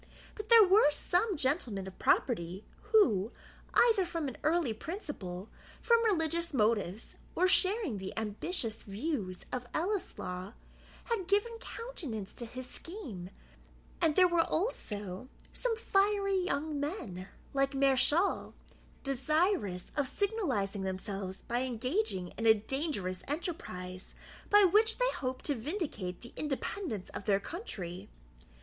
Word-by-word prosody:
But 425 -1 -8
there 460 -2 +10
were 385 -4 +6
some 360 +6 +1
gentlemen 255 - 0
of 190 -1 -10
property, 185 -5 +1 0.3
who, 230 - +4 0.4
either 455 -5 +5
from 330 -5 -3
early 310 -5 +2
principle, 220 - -6 0.3
from 465 -1 +4
religious 335 -6 +1
motives, 215 -3 0 0.2
or 365 - +4
sharing 370 - +3
the 190 0 -5
ambitious 225 - -2
views 200 - -3
of 250 -1 -3
Ellieslaw, 240 - -2 0.5
had 445 -7 -2
given 415 +4 +1
countenance 300 - -6
to 235 - -7
his 255 +2 -6
scheme; 250 - -7 0.7
and 320 -3 +3
there 370 -1 +7
were, 345 -1 +3
also, 210 - -2 0.2
some 475 -3 -1
fiery 395 -2 +2
young 295 -2 -1
men, 250 - -4 0.3
like 275 0 +1
Mareschal, 275 +7 +3 0.5
desirous 275 - 0
of 290 -3 +1
signalizing 265 - -1
themselves 190 0 -4
by 240 +1 -1
engaging 250 - -1
in 225 - +1
a 220 - +8
dangerous 215 - -2
enterprise, 190 - -5 0.3
by 415 0 +7
which 430 +4 +5
they - - +2
hoped 255 - -4
to 290 - +2
vindicate 240 - -4
the 240 - -11
independence 275 - -3
of - - -7
their 200 -2 +3
country. 195 - -6
275 Hz, 125 wpm, -32 LUFS, -, 0.7 s, there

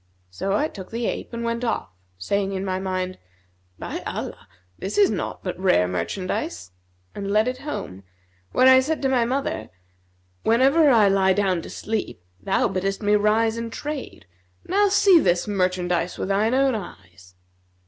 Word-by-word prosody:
So 150 - -2
I 295 +9 +2
took 190 -10 -10
the 230 +1 -3
ape - - -3
and 235 0 -5
went 235 +1 -2
off, 225 - -2 0.3
saying 195 - -1
in 190 0 -3
my 185 -1 -1
mind, 185 -1 -3 0.6
'By - - -5
Allah, - - -6 0.3
this 195 - -4
is 410 -1 +5
naught - - -4
but - - -4
rare 135 - +3
merchandise!' 90 - -3 0.4
and 200 -1 -5
led 215 +3 +3
it 255 0 -3
home, 100 - -6 0.5
where 255 - +4
I 260 0 +8
said 300 +3 -2
to 270 - +2
my 250 -3 +2
mother, 255 - -2 0.7
'Whenever 275 +7 +4
I 225 -6 +5
lie 195 -1 +3
down 185 -3 +1
to - - -10
sleep, 215 - -4 0.2
thou 90 - +1
biddest 195 +3 -2
me 205 0 +3
rise 220 +2 +2
and 230 0 -4
trade; 295 - -6 0.6
see 390 -2 +6
now - - +3
this 175 +1 +1
merchandise 180 -3 0
with - - -3
thine 215 +5 +2
own 270 0 +3
eyes.' 90 - -9
205 Hz, 170 wpm, -23 LUFS, 185-240 Hz, 0.7 s, I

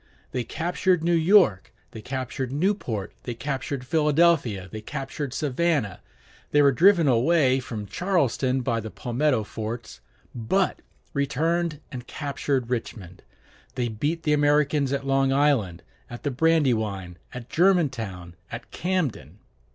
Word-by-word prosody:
They 125 - -2
captured 175 +5 0
New 170 +1 +2
York, 165 - +4 0.2
they 110 - -9
captured 130 +1 -4
Newport, 140 - -1
they 120 - -5
captured 135 0 -4
Philadelphia, 150 - +2
they 110 - -6
captured 135 +4 -5
Savannah; 140 - 0 0.5
they 145 0 +4
were 140 - +6
driven 175 +3 +5
away 130 +2 +3
from 110 -5 -6
Charleston 135 - 0
by 120 -2 0
the 110 0 -6
palmetto 125 +1 0
forts, 110 +2 -6 0.3
but 180 - 0 0.3
returned 155 +3 0
and 125 -3 -7
captured 140 -3 -2
Richmond. 100 -7 -5 0.5
They 120 -1 -1
beat 145 +10 -2
the 150 - +2
Americans 145 -1 +2
at 140 -1 -2
Long 135 0 +2
Island, 135 - +1 0.3
at 120 - -9
the 145 - -1
Brandywine, 115 - +1
at 125 -2 -8
Germantown, 130 - +1 0.2
at 115 +1 -8
Camden. 145 - -2
135 Hz, 130 wpm, -25 LUFS, 115-155 Hz, 0.5 s, were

